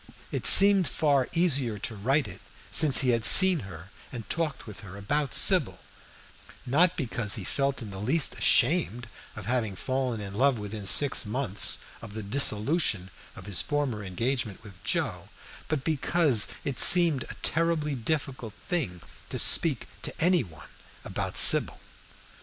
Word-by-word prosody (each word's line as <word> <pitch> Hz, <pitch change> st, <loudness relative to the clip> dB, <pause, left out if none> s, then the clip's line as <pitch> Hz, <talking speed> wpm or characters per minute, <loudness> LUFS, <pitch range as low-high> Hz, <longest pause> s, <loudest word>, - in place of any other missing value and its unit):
It -, -, +2 dB
seemed 195 Hz, -2 st, +8 dB
far 140 Hz, -4 st, -2 dB
easier 140 Hz, -10 st, -1 dB
to 110 Hz, +3 st, -7 dB
write 130 Hz, +8 st, -2 dB
it -, -, -13 dB, 0.3 s
since 145 Hz, -3 st, +4 dB
he 130 Hz, -, -1 dB
had 115 Hz, -2 st, -1 dB
seen 185 Hz, -, +7 dB
her 95 Hz, -, -13 dB, 0.2 s
and 115 Hz, -6 st, -10 dB
talked 160 Hz, -5 st, -4 dB
with 105 Hz, -4 st, -12 dB
her 100 Hz, -1 st, -13 dB
about 140 Hz, +7 st, -4 dB
Sybil, -, -, +3 dB, 0.9 s
not 170 Hz, +8 st, 0 dB
because 115 Hz, -7 st, -2 dB
he -, -, -7 dB
felt 140 Hz, -2 st, -4 dB
in 105 Hz, -, -11 dB
the 95 Hz, -, -10 dB
least 140 Hz, +8 st, 0 dB
ashamed 120 Hz, -4 st, -1 dB, 0.3 s
of 105 Hz, -, -11 dB
having 115 Hz, -4 st, -4 dB
fallen 130 Hz, +1 st, -5 dB
in 100 Hz, -1 st, -9 dB
love 130 Hz, +4 st, 0 dB
within 105 Hz, -1 st, -8 dB
six 135 Hz, +9 st, +2 dB
months 110 Hz, -2 st, -1 dB, 0.2 s
of 110 Hz, -2 st, -12 dB
the 110 Hz, -, -7 dB
dissolution 105 Hz, -, -2 dB, 0.2 s
of -, -, -14 dB
his 100 Hz, -3 st, -3 dB
former 140 Hz, -8 st, -5 dB
engagement 110 Hz, +2 st, -5 dB
with 95 Hz, -4 st, -17 dB
Joe, -, -, -5 dB, 0.4 s
but 155 Hz, -4 st, -5 dB
because 155 Hz, -5 st, +1 dB, 0.2 s
it 135 Hz, -3 st, -5 dB
seemed 170 Hz, -6 st, +7 dB
a -, -, -9 dB
terribly 160 Hz, -2 st, -2 dB
difficult 130 Hz, -3 st, -6 dB
thing 125 Hz, -, -6 dB, 0.3 s
to -, -, -6 dB
speak -, -, +2 dB
to -, -, -8 dB
any 175 Hz, +1 st, +1 dB
one 80 Hz, -7 st, -14 dB, 0.4 s
about -, -, -5 dB
Sybil. -, -, +4 dB
125 Hz, 155 wpm, -25 LUFS, 105-150 Hz, 0.9 s, seemed